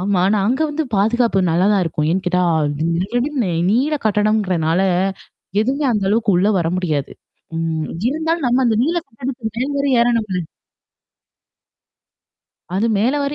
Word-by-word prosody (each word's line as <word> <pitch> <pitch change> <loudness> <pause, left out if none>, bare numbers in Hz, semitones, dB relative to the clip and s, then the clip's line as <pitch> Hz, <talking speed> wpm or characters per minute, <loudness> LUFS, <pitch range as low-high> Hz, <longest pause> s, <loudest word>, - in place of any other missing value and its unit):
ஆமா. 195 0 0
ஆனா, 215 - +2
அங்க 260 +4 0
வந்து 310 +1 -2
பாதுகாப்பு 225 0 +2
நல்லா 175 +4 +2
தான் 200 -2 +2
இருக்கும். 155 -2 -2
ஏன்னு 185 +2 -1
கேட்டா 180 0 +2 0.3
நெடு 165 +4 -1
நெடுன்னு 245 -5 0 0.2
நீள 270 +7 +2
கட்டிடம்ங்கிறனால, 195 -5 +1 0.8
எதுவுமே 275 +4 -1
அந்த 210 -2 0
அளவுக்கு 215 -1 +2
உள்ள 195 +4 +3
வர 170 - 0
முடியாது. 155 -6 -2 0.5
ம். 160 -1 -2 0.2
இருந்தாலும் 320 +2 -1
நம்ம 250 +2 +2
அந்த 225 - +2
நீள 330 +6 0
கட்டடத்துக்கு 235 -2 -6
மேல் 280 +3 -2
வரை 280 0 +1
ஏறனும்ல்ல! 225 -6 +1 2.3
அது 210 +4 +1
மேல 240 +8 +1
வர 280 +1 -2
215 Hz, 145 wpm, -19 LUFS, 180-260 Hz, 2.3 s, உள்ள